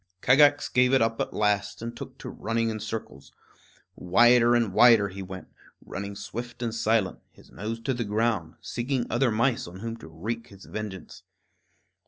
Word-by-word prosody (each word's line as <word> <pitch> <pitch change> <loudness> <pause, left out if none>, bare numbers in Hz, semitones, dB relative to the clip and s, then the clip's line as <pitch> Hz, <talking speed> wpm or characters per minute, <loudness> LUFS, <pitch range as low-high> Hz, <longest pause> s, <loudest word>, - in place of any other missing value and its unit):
Kagax 145 +2 +5
gave 125 +1 +3
it 135 - +5
up 115 0 -1
at - - -2
last 105 -1 0
and 115 +1 -6
took - - -9
to - - -9
running 115 0 -1
in 110 - -5
circles. 105 -10 -7 0.6
Wider 120 +6 +5
and 115 -5 +1
wider 115 -3 +6
he 95 +1 -8
went, 95 0 -8 0.4
running 100 0 -6
swift 120 +5 -7
and 115 -2 -2
silent, 110 -4 +1
his - - -20
nose 110 +3 -5
to 130 +3 -1
the 120 -1 -2
ground, 105 -6 -1
seeking 125 0 -2
other 120 +2 +2
mice 115 +1 +1
on 90 +2 -10
whom 115 0 -4
to 115 - -12
wreak 110 +9 -5
his 100 -1 -14
vengeance. 105 -5 -7
115 Hz, 175 wpm, -26 LUFS, 100-120 Hz, 0.6 s, wider